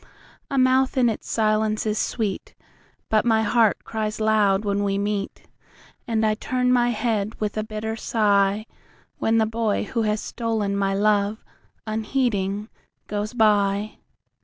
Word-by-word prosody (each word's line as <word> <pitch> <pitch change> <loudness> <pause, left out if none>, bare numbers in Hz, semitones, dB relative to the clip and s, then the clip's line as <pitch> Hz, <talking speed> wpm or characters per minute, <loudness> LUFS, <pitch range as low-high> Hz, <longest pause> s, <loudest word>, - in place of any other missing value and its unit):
A 275 - -2
mouth 260 +1 +3
in 245 -2 +4
its 220 - -5
silence 215 -1 +1
is 215 0 0
sweetBut 215 0 -3
my 225 -2 +2
heart 220 -1 +2
cries 215 -1 -3
loud 210 -2 +2
when 200 0 0
we 195 -1 0
meet, 200 0 -3 0.6
And 220 -1 +1
I 215 - +3
turn 250 +3 0
my 245 -1 +3
head 220 -2 -1
with 210 -2 -2
a 215 - -1
bitter 215 0 -4
sighWhen 210 +1 -1
the 220 - +3
boy 220 -1 -1
who 230 +3 -2
has 215 -1 0
stolen 220 -4 -2
my 195 -1 0
love, 205 +1 +1 0.4
unheeding, 215 -2 -1 0.4
goes 210 +1 -3
by. 205 -2 +2
215 Hz, 135 wpm, -23 LUFS, 205-225 Hz, 0.6 s, in